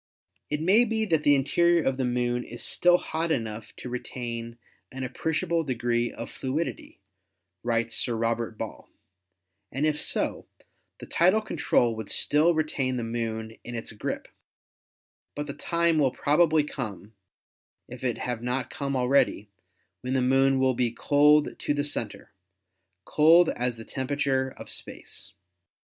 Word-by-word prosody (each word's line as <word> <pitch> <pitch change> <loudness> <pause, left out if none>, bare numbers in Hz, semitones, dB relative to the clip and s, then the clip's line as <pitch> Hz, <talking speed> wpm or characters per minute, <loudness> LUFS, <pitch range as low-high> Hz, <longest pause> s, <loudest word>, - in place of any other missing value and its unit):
"It 150 0 -1
may 200 +7 +5
be 220 -1 0
that 160 -7 +2
the 145 -1 +5
interior 170 +5 +3
of 135 -1 0
the 130 - 0
Moon 120 0 0
is - - -5
still 175 0 +4
hot 160 -1 -2
enough 110 -5 -3
to - - -8
retain 120 -1 -5 0.3
an 130 0 -6
appreciable 160 +6 -1
degree 120 -3 0
of 115 - -8
fluidity," 140 +6 -4 0.6
writes 115 -1 0
Sir 120 - 0
Robert 115 0 -1
Ball, - - -7 0.8
"and 135 +4 -1
if 150 -1 0
so, - - -2 0.5
the - - -8
tidal 185 +6 +3
control 120 - +1
would 110 -2 -6
still 160 +3 +3
retain 140 -5 -1
the 120 - -2
Moon 115 -1 -4
in 120 - -7
its 115 - -5
grip; 105 - -4 1.1
but 145 - -3
the 140 - -5
time 170 0 +1
will 140 -3 +4
probably 155 +4 +3
come, 110 -7 -6 0.7
if 125 +1 -10
it 125 -3 0
have 120 -2 -3
not 125 +2 -2
come 140 -1 -3
already, 125 -5 +2 0.5
when 130 +1 -3
the 130 - +2
Moon 135 +1 +3
will 130 0 +3
be 120 -1 +1
cold 145 +5 +3
to 145 - 0
the 145 - 0
center 115 -7 -5 0.4
— 95 0 -52
cold 165 +3 +5
as 125 -1 -2
the 115 - -9
temperature 130 -1 -1
of - - -9
space. - - -6
130 Hz, 150 wpm, -27 LUFS, 120-150 Hz, 1.1 s, may